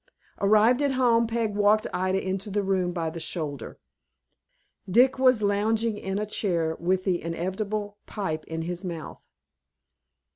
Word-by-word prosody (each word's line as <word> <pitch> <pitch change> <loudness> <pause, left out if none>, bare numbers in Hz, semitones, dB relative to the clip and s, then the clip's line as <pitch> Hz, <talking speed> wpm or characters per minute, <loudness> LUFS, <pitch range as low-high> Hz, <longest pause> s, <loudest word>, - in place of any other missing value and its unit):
Arrived 215 +6 +4
at 285 -2 +1
home, 235 -3 +3
Peg 225 -2 -1
walked 210 +1 +3
Ida 185 +1 0
into 195 +2 -2
the 205 +1 -1
room 190 -2 0
by 165 -2 -2
the 165 - -7
shoulder. 150 -7 -4 1.1
Dick 255 +7 +4
was 255 -4 +4
lounging 215 +2 +1
in 195 -1 -4
a 210 - -1
chair, 170 -6 -1
with 185 +2 0
the 185 -3 0
inevitable 205 +5 -3
pipe 160 -7 -3
in 165 0 -4
his 175 +2 -4
mouth. 170 -4 -7
200 Hz, 145 wpm, -26 LUFS, 175-215 Hz, 1.1 s, Arrived